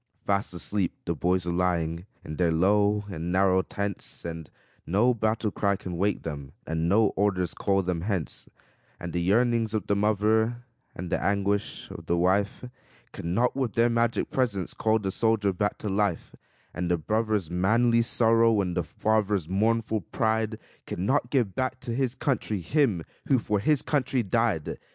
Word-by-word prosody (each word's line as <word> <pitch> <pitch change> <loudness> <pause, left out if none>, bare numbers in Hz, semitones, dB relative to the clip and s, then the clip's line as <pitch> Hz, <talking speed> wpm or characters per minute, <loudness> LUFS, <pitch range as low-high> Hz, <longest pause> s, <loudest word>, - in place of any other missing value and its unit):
Fast 100 0 0
asleep 95 +1 -1
the 85 - 0
boys 90 +3 0
are 85 - -1
lying, 85 0 -1 0.2
in 75 - -6
their 85 -2 +2
low 100 +5 +3
and 85 -1 -4
narrow 95 0 +3
tents, 100 -2 -5
And 80 -2 -6 0.4
no 105 +8 +3
battle 110 -1 0
cry 100 0 +1
can 90 -3 -6
wake 100 +3 0
them, 70 -4 -6
and 80 +1 -1
no 105 +2 +4
orders 95 -4 0
call 95 -1 +1
them 90 -2 -2
hence; 95 -4 -3 0.5
And 85 -1 -6
the 85 - 0
yearnings 115 +3 +2
of 110 - -1
the 100 - +1
mother, 110 +3 +1 0.3
and 90 0 -6
the - - 0
anguish 100 +1 -1
of 85 - -9
the 85 - +1
wife, 95 +6 +1 0.5
Can 85 +2 -4
not 125 +3 +2
with 130 -5 -1
their 115 +1 +3
magic 115 0 0
presence 105 -9 -1
call 110 0 +2
the 100 -3 -3
soldier 110 -2 +1
back 105 +3 -1
to - - -6
life; 100 -3 -1 0.4
And 90 -1 -2
the 90 - +2
brother's 105 0 -1
manly 115 +6 +3
sorrow, 115 -1 +3
and 90 -3 -1
the 90 - +1
father's 105 +1 0
mournful 110 +3 +1
pride, 110 +3 -1 0.3
Can 90 - -3
not 130 +1 +1
give 120 -9 +1
back 130 +4 -2
to 120 - -4
his 130 0 -1
country 125 -8 -1
him 105 - +1 0.2
who 135 - +4
for 105 -3 0
his 145 +7 +2
country 135 -4 0
died. 110 -6 0
100 Hz, 175 wpm, -27 LUFS, 90-115 Hz, 0.5 s, no